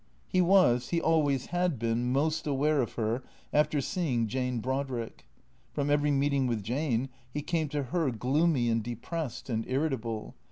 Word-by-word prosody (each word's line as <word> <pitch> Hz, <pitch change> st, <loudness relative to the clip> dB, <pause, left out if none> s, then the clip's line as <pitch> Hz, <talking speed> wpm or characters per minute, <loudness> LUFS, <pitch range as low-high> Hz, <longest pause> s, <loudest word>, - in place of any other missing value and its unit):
He 185 Hz, -, +2 dB
was, 175 Hz, -10 st, +4 dB
he 170 Hz, -, +1 dB
always 150 Hz, -5 st, +2 dB
had 175 Hz, -4 st, +1 dB
been, 115 Hz, +2 st, 0 dB
most 155 Hz, +4 st, 0 dB
aware 145 Hz, +1 st, +2 dB
of 120 Hz, -, -3 dB
her 115 Hz, +2 st, -1 dB, 0.3 s
after 150 Hz, 0 st, +3 dB
seeing 135 Hz, -8 st, 0 dB
Jane 125 Hz, +1 st, -1 dB
Brodrick. 130 Hz, -, -3 dB, 0.5 s
From 145 Hz, 0 st, 0 dB
every 145 Hz, 0 st, +3 dB
meeting 140 Hz, -1 st, +2 dB
with 115 Hz, -4 st, -1 dB
Jane 130 Hz, +2 st, -1 dB, 0.2 s
he 150 Hz, +2 st, -3 dB
came 160 Hz, -2 st, -1 dB
to 145 Hz, -1 st, -1 dB
her 150 Hz, +3 st, 0 dB
gloomy 130 Hz, +3 st, +2 dB
and 115 Hz, 0 st, +2 dB
depressed 120 Hz, +5 st, -5 dB
and 115 Hz, -3 st, -1 dB
irritable. 130 Hz, -6 st, -2 dB
135 Hz, 160 wpm, -29 LUFS, 120-155 Hz, 0.5 s, was